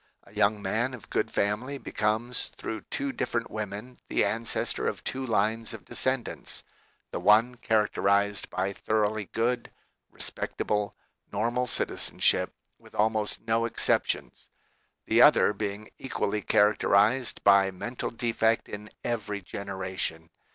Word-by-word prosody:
A 100 - -19
young 105 0 +3
man 120 +6 0
of 120 - -15
good - - +1
family 115 +8 -1
becomes 115 0 -1
through 110 - -4
two 280 0 -1
different 115 - -2
women 105 +4 -5
the - - +3
ancestor 115 +1 -1
of - - -3
two 130 +1 -2
lines 115 -1 0
of 110 - -12
descendants, 130 -2 -2 0.5
the - - -3
one 110 +4 +5
characterized 100 -3 +1
by 95 +2 -1
thoroughly 110 0 0
good, 120 +4 -1 0.4
respectable, 105 -1 -2 0.4
normal 120 +5 0
citizenship, - - +1 0.3
with - - -17
almost 110 0 +1
no 115 0 +1
exceptions; 115 - 0 0.6
the - - +4
other - - +7
being 105 0 -4
equally 105 -5 -1
characterized 105 +4 +3
by 100 -1 +6
mental 120 +7 -4
defect 115 -1 +1
in 105 +1 -7 0.2
every 105 -4 -2
generation. 95 -3 -5
110 Hz, 125 wpm, -28 LUFS, 100-115 Hz, 0.6 s, other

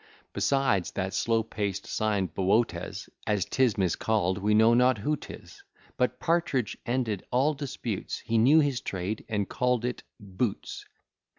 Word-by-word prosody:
Besides, 135 -10 +1
that 95 0 -3
slow 115 +2 +1
paced 100 -3 -3
sign 105 -4 0
Böötes, 95 0 0 0.2
As 105 -3 +1
'tis 120 0 +1
miscall'd, 95 +1 +1
we 105 +2 +2
know 110 +2 +6
not 125 0 +4
who 150 +9 0
'tis; - - -11 0.3
But 125 - 0
Partridge 165 -8 0
ended 120 -5 -1
all 135 +5 +2
disputes; 130 -7 -4
He 115 0 0
knew 145 +8 +6
his 140 -4 0
trade, 95 +3 -4
and 105 -3 -1
call'd 125 -1 0
it 125 - -3 0.2
boots. 100 +1 -4
110 Hz, 140 wpm, -28 LUFS, 100-125 Hz, 0.3 s, know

